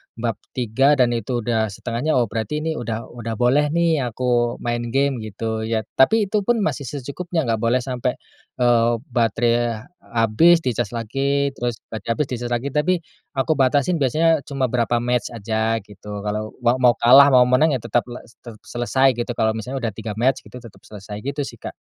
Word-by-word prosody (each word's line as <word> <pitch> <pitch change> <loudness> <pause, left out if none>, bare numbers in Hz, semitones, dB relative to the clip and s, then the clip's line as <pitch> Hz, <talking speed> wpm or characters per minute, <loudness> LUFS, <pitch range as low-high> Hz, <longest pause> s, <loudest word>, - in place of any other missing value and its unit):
bab 115 0 -3 0.2
3 130 +4 +3
dan 125 -3 +3
itu 120 0 -2
udah 110 -2 0
1/2-nya, 120 +9 -2
oh 125 - +4
berarti 115 +7 -3
ini 160 - -1
udah, 115 -1 -4
udah 115 -2 -5
boleh 130 +6 +3
nih 170 -3 +2
aku 120 0 0
main 120 0 -2
game 135 0 0
gitu 110 +1 -4
ya. 110 -1 -1 0.2
Tapi 220 +11 +5
itupun 215 +1 +1
masih 140 - -2
secukupnya, 155 +5 -3
nggak 115 -3 -1
boleh 120 +2 +1
sampai, 125 -3 -2 0.4
eee, 120 -1 +3 0.2
baterai 115 -1 +1 0.3
habis, 160 +10 +4
dicas 120 -2 -2
lagi, 140 +5 0
terus 120 -4 -4
batre 110 -1 -7
habis, 150 - -1
dicas 120 0 -3
lagi. 120 +3 -2
Tapi 150 +6 +2 0.4
aku 135 +4 0
batasin 140 +5 +2
biasanya 160 +4 +2
cuma 135 -3 -1
berapa 120 -1 +1
match 125 -2 0
aja 110 +1 -1
gitu. 105 0 -9
Kalau 105 +1 -4
mau 120 +2 +3
mau 125 -1 +5
kalah, 135 +4 +7
mau 130 -3 +6
menang, 130 +4 +3
ya 120 - -5
tetap 120 +2 0
le 120 - -9
se 115 - -22 0.2
selesai 130 +2 +1
gitu. 120 - -2
Kalau 110 -1 +2
misalnya 125 +4 -5
udah 115 - 0
3 110 0 -6
match 125 +5 +1
gitu, - - -14
tetap 115 - -14
selesai 105 0 -8
gitu 140 +4 -3
sih, - - -9
Kak. - - -7
120 Hz, 185 wpm, -21 LUFS, 115-135 Hz, 0.4 s, kalah